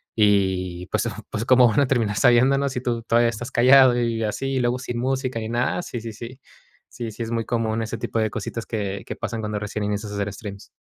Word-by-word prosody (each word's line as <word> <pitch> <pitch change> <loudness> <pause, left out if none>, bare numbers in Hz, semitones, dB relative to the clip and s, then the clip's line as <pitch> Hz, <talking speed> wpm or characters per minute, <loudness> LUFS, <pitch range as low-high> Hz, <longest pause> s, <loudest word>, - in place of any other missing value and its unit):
Y, 95 -4 +1
pues, - - -1 0.2
¿có 110 +1 -3
cómo 125 -1 +6
van 115 +4 +2
a - - +4
terminar 115 -5 +1
sabiéndolo 130 +4 +4
si 125 -1 -4
tú 120 -2 -2
todavía 115 +1 +3
estás 115 +1 -6
callado 130 0 +6
y 115 -1 -1
así? 135 +5 -2
Y - - +1
luego 125 0 0
sin 120 -1 -5
música 130 -1 -1
ni 110 - -4
nada, 120 +9 -1
sí, 120 - -6
sí, 115 0 -6
sí. 120 +4 -9 0.5
Sí, 120 -2 -6
sí 110 - -9
es 115 - -5
muy 115 -1 -1
común 115 -2 -1
ese 115 +1 -4
tipo 115 - -4
de 110 0 +1
cositas 115 +2 -5
que 100 -3 -4
que - - -5
pasan 115 - -4
cuando 105 -1 -3
recién 105 0 -4
inicias 105 0 -3
a - - -5
hacer 100 0 -2
streams. 100 -1 -9
115 Hz, 235 wpm, -23 LUFS, 105-125 Hz, 0.5 s, cómo